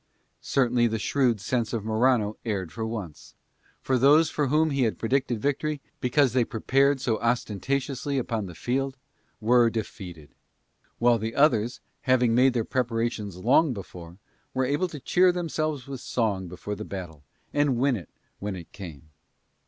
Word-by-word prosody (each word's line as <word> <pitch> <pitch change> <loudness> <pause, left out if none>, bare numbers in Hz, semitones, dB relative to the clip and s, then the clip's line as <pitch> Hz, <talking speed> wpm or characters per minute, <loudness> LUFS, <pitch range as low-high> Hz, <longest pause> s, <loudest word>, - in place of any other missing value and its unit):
Certainly 120 -2 +2
the 110 0 -1
shrewd 120 -1 +1
sense 115 +2 -1
of 110 -3 -2
Morano 110 -1 +2
erred 95 -7 -3
for 110 -1 -4
once; 100 -10 -7 0.5
for 130 -1 +1
those 150 +5 +5
for 145 -2 0
whom 155 +3 +2
he 135 -1 0
had 115 -3 +1
predicted 125 0 0
victory, 145 +4 -1 0.2
because 130 0 +2
they 125 -2 +4
prepared 135 +4 +2
so 115 -3 0
ostentatiously 130 +4 -1
upon 115 -5 -2
the 90 - -10
field, 135 +6 -2 0.4
were 120 +1 +4
defeated; 90 - -7 0.6
while 120 -1 +4
the 110 +2 -4
others, 125 -5 +2 0.3
having 125 -2 +4
made 125 +2 +5
their 115 -2 +1
preparations 115 -5 -2
long 130 - +3
before, 90 -4 -9 0.4
were 130 0 +2
able 145 +8 +1
to 155 -4 -8
cheer 180 +6 +4
themselves 155 -6 -2
with 135 -2 -6
song 100 -6 -1
before 90 +4 -6
the - - -5
battle 85 -6 -7 0.3
and 145 0 +3
to - - +2
win 130 +2 +2
it 90 -9 -8 0.3
when 100 -1 -3
it 85 -3 -10
came. 80 -6 -10
120 Hz, 160 wpm, -26 LUFS, 105-135 Hz, 0.6 s, those